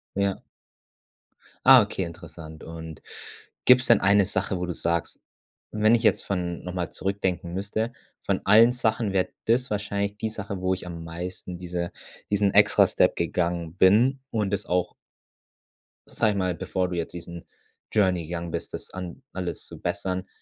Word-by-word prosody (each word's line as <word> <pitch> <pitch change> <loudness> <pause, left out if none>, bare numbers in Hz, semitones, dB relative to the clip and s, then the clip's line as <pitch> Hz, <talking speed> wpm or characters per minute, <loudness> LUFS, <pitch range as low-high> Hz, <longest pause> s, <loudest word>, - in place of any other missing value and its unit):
Ja. 100 -1 0 1.3
Ah, 130 -2 +10
okay, 100 -2 -3
interessant. 80 -2 -10
Und 80 -1 -9 0.6
gibt's 125 0 +7
denn 115 -3 +5
eine 100 0 +5
Sache, 95 -1 -1
wo 90 - -2
du 90 - -3
sagst: 85 0 -2 0.5
„Wenn 110 +1 +4
ich 115 - +2
jetzt 115 - +3
von 90 -3 -3
noch 90 - -5
mal 90 -2 -2
zurückdenken 95 -3 -2
müsste, 105 +5 -2 0.3
von - - 0
allen 110 +4 +7
Sachen 110 -4 0
wäre 95 -1 +1 0.2
das 125 +3 +1
wahrscheinlich 100 0 -2
die 110 +1 -3
Sache, 100 -3 -5
wo 95 - +1
ich 95 -1 -4
am 85 -1 -7
meisten 90 +2 -6
diese 90 -1 -4 0.4
diesen 100 -1 +2
extra - - +6
Step - - +2
gegangen 85 -1 -1
bin.“ 115 +9 +4
Und 105 -3 0
es - - -3
auch 90 0 0 1.2
sage 110 - +1
ich 100 - -4
mal, 90 -2 0
bevor 90 +3 -2
du 90 - -4
jetzt 85 - -3
diesen 85 0 -9 0.5
Journey 95 -5 +2
gegangen 85 0 -4
bist, - - -5
das - - -7
an 95 +6 -7
alles 90 -2 -5
zu - - -10
bessern, 95 0 -3
95 Hz, 165 wpm, -25 LUFS, 85-105 Hz, 1.3 s, Ah